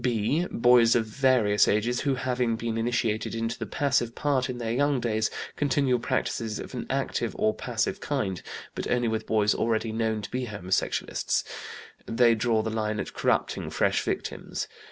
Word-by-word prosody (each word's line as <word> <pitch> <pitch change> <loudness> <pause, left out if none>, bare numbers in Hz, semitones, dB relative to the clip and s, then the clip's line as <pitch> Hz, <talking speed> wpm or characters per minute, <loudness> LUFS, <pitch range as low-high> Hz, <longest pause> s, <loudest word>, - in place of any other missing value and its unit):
"(b) 125 +8 +1
Boys 120 -1 +5
of 115 -2 +2
various 110 -4 +3
ages 115 +4 +1
who, 140 -2 +1
having 125 -2 0
been 115 0 -3
initiated 115 -1 0
into 115 0 -2
the - - -4
passive 135 -5 0
part 135 -3 0
in 125 - -4
their 115 -2 -2
young 140 +2 +2
days, 110 -2 0 0.3
continue 135 -3 +2
practices 115 -2 -1
of - - -8
an - - -5
active - - -1
or 110 - +2
passive - - -2
kind; 95 -3 -2 0.3
but - - -4
only 120 -1 +2
with 110 -1 -2
boys 105 -2 +3
already 110 0 0
known 110 -1 0
to 100 -3 -7
be 125 0 -2
homosexualists; 95 -3 -1 0.6
they 115 0 +4
draw 110 0 +1
the 110 - -2
line 110 -1 -1
at - - -4
corrupting - - 0
fresh - - +1
victims. - - -3
115 Hz, 170 wpm, -27 LUFS, 110-125 Hz, 0.6 s, Boys